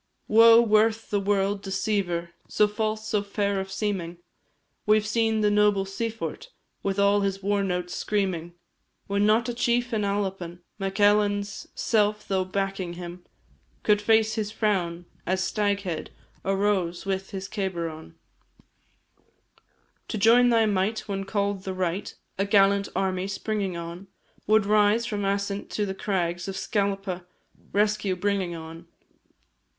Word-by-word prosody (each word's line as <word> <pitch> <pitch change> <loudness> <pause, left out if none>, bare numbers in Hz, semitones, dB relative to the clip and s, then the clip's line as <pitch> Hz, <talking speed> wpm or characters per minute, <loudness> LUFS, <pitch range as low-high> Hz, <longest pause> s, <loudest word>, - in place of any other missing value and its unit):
Woe 230 +1 +7
worth 220 0 +2
the 205 - +2
world, 200 0 0
deceiver 190 -3 -1 0.2
So 210 - +3
false, 215 +1 -2
so 210 -1 +1
fair 200 -1 -1
of 190 0 -5
seeming! 190 -4 -2 0.7
We 215 0 +6
've 210 - -6
seen 220 0 +1
the 210 -1 +3
noble 205 -1 +3
Siphort 225 - -4 0.3
With 195 0 -2
all 200 0 +4
his 195 -1 -2
war 200 0 +1
notes 180 -2 -2
screaming; 180 -5 -2 0.5
When 200 +1 +1
not 225 +2 +3
a 240 - -2
chief 240 +1 0
in 215 - +1
Albain, 195 -4 -2 0.2
Mac 195 0 -3
Ailein's 205 0 +2
self 210 -1 +1
though 190 -1 +1
backing 195 -1 -3
him, 175 0 -8 0.6
Could 210 -1 +3
face 220 +1 +3
his 215 -2 -2
frown 185 -6 -1 0.2
as 185 +1 +1
Staghead 200 -5 -1 0.4
Arose 195 -3 0
with 195 0 -2
his 195 -2 -5
cabar 190 -5 -2
on. 155 - -10 1.9
To - - -3
join 235 +4 +6
thy 230 -2 +4
might, 210 +1 0
when 195 -1 -3
call'd 200 -1 -1
the 190 -1 -4
right, 185 +1 -2 0.3
A 195 - +2
gallant 200 0 +3
army 190 -1 0
springing 200 -2 -2
on, 170 +3 -7 0.4
Would 215 -1 +4
rise, 210 +2 +3
from 210 -3 -3
Assint 200 0 -2
to 210 - -1
the 190 - -3
crags 180 -2 -2
Of 195 0 -4
Scalpa, 195 -3 -2 0.4
rescue 210 -2 +1
bringing 190 -2 -1
on. 165 +1 -9
200 Hz, 145 wpm, -26 LUFS, 190-210 Hz, 1.9 s, Woe